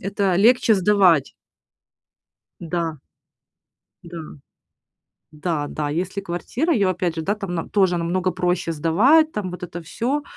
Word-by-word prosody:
это 195 Hz, -1 st, 0 dB
легче 225 Hz, +3 st, +4 dB
сдавать. 185 Hz, -6 st, +3 dB, 1.3 s
Да. 165 Hz, -2 st, -3 dB, 1.1 s
Да. 170 Hz, 0 st, -8 dB, 1.1 s
Да 150 Hz, -1 st, -2 dB
да, 150 Hz, -1 st, -3 dB
если 185 Hz, +5 st, -3 dB
квартира, 230 Hz, -, -2 dB
её 200 Hz, -7 st, +2 dB
опять 180 Hz, -2 st, -1 dB
же, 165 Hz, -, -3 dB
да, 200 Hz, +5 st, 0 dB
там 195 Hz, -4 st, -5 dB
на 165 Hz, -, -1 dB
там -, -, -13 dB
тоже 185 Hz, -4 st, +2 dB
намного 180 Hz, +2 st, -1 dB
проще 180 Hz, -1 st, -1 dB
сдавать, 225 Hz, -, +4 dB
там 205 Hz, -3 st, -4 dB
вот 180 Hz, 0 st, -9 dB
это 175 Hz, 0 st, -7 dB
всё, 255 Hz, -, -2 dB
180 Hz, 140 wpm, -22 LUFS, 170-205 Hz, 1.3 s, легче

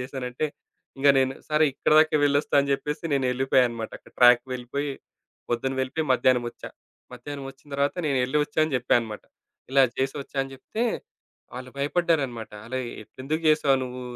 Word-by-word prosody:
చేశానంటే 130 Hz, +2 st, -3 dB, 0.5 s
ఇంక 140 Hz, -, +4 dB
నేను 130 Hz, 0 st, +1 dB
సరే 155 Hz, 0 st, +3 dB
ఇక్కడిదాకా 155 Hz, +3 st, +4 dB
వెళ్లి 140 Hz, 0 st, +3 dB
వస్తా -, -, -6 dB
అని 140 Hz, -, -2 dB
జెప్పేసి 150 Hz, +3 st, -3 dB
నేనెళ్ళిపోయానన్నమాట. 125 Hz, -3 st, +1 dB
అక్కడ -, -, -20 dB
ట్రాక్‌కి 120 Hz, -1 st, +7 dB
వెళ్ళిపోయి, 140 Hz, +3 st, -3 dB, 0.6 s
పొద్దున 120 Hz, +3 st, 0 dB
వెళ్ళిపోయి 130 Hz, +5 st, -2 dB
మధ్యాహ్నం 125 Hz, -1 st, +3 dB
వచ్చా. -, -, -10 dB, 0.4 s
మధ్యాహ్నం 140 Hz, +3 st, -7 dB
వచ్చిన 135 Hz, +2 st, -22 dB
తరువాత 140 Hz, +3 st, 0 dB
నేను 140 Hz, -3 st, +1 dB
వెళ్లి 140 Hz, +4 st, 0 dB
వచ్చాను 150 Hz, +1 st, +1 dB
అని 150 Hz, -, -4 dB
చెప్పాను 125 Hz, -1 st, +2 dB
అనమాట. 110 Hz, -2 st, -7 dB, 0.5 s
ఇలా 135 Hz, 0 st, +5 dB
చేసి 135 Hz, 0 st, -1 dB
వచ్చాను 140 Hz, 0 st, -3 dB
అని 135 Hz, -, -11 dB
చెప్తే 215 Hz, -, -5 dB, 0.7 s
వాళ్ళు 130 Hz, 0 st, -7 dB
భయపడ్డారన్నమాట. 140 Hz, -6 st, 0 dB, 0.2 s
"అలా 130 Hz, +2 st, -3 dB, 0.4 s
ఎందుకు 155 Hz, +4 st, -1 dB
జేసావు 150 Hz, -3 st, +4 dB
నువ్వు?" 125 Hz, 0 st, -6 dB
135 Hz, 155 wpm, -25 LUFS, 125-145 Hz, 0.7 s, ట్రాక్‌కి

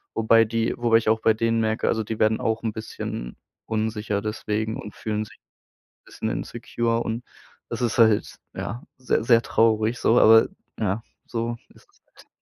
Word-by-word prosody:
Wobei 115 Hz, 0 st, +5 dB
die 115 Hz, +1 st, -1 dB
wobei 120 Hz, -2 st, +4 dB
ich 110 Hz, -1 st, 0 dB
auch 110 Hz, 0 st, +2 dB
bei 110 Hz, -, +4 dB
denen 115 Hz, +1 st, 0 dB
merke, 110 Hz, 0 st, 0 dB
also, 110 Hz, -, +1 dB
die 110 Hz, +1 st, -5 dB
werden 110 Hz, 0 st, +3 dB
auch 110 Hz, -1 st, -1 dB
'n 115 Hz, -, -2 dB
bisschen 105 Hz, -, -6 dB, 0.3 s
unsicher 110 Hz, -2 st, -2 dB
deswegen 110 Hz, +1 st, -3 dB
und 105 Hz, -, -8 dB
fühlen 110 Hz, 0 st, -3 dB
sich -, -, -17 dB, 0.7 s
bisschen -, -, -4 dB
insecure 115 Hz, 0 st, -2 dB
und 115 Hz, +2 st, -4 dB, 0.4 s
das -, -, -5 dB
ist 120 Hz, -1 st, 0 dB
halt, 110 Hz, -3 st, +3 dB, 0.2 s
ja, 120 Hz, +5 st, -5 dB
sehr, 130 Hz, -2 st, 0 dB
sehr 115 Hz, -1 st, +5 dB
traurig 110 Hz, 0 st, +2 dB
so, 115 Hz, -, +3 dB
aber 110 Hz, 0 st, +7 dB, 0.3 s
ja, 105 Hz, 0 st, -1 dB, 0.2 s
so 115 Hz, 0 st, -3 dB
ist -, -, -21 dB
es -, -, -32 dB
halt. -, -, -18 dB
110 Hz, 175 wpm, -24 LUFS, 110-115 Hz, 0.7 s, aber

